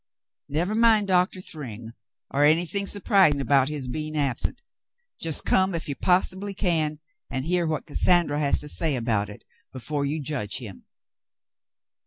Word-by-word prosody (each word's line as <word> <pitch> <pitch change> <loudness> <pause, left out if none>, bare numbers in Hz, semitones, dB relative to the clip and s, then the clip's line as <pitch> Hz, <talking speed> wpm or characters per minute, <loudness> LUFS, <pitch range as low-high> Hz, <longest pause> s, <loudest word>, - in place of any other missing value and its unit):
"Never 170 +8 -1
mind 220 -2 +4
Doctor 185 +1 +1
Thryng 120 - -7 0.4
or 145 - +2
anything 170 +6 +2
surprising 195 -8 +3
about 135 0 +2
his 145 -4 -5
being 155 +4 -4
absent; 135 -4 -1 0.6
just 160 -3 -1
come 190 -1 +2
if 165 - -4
you 145 - -2
possibly 190 +4 0
can 155 -5 0 0.3
and 130 +1 -4
hear 175 0 +1
what 155 -1 -3
Cassandra 165 -1 +2
has 145 -2 +2
to 150 - -6
say 150 0 +2
about 115 -4 0
it 105 - -12 0.3
before 140 +3 -3
you 145 +3 -1
judge 135 -8 -2
him. 105 -7 -9
155 Hz, 150 wpm, -25 LUFS, 140-180 Hz, 0.6 s, mind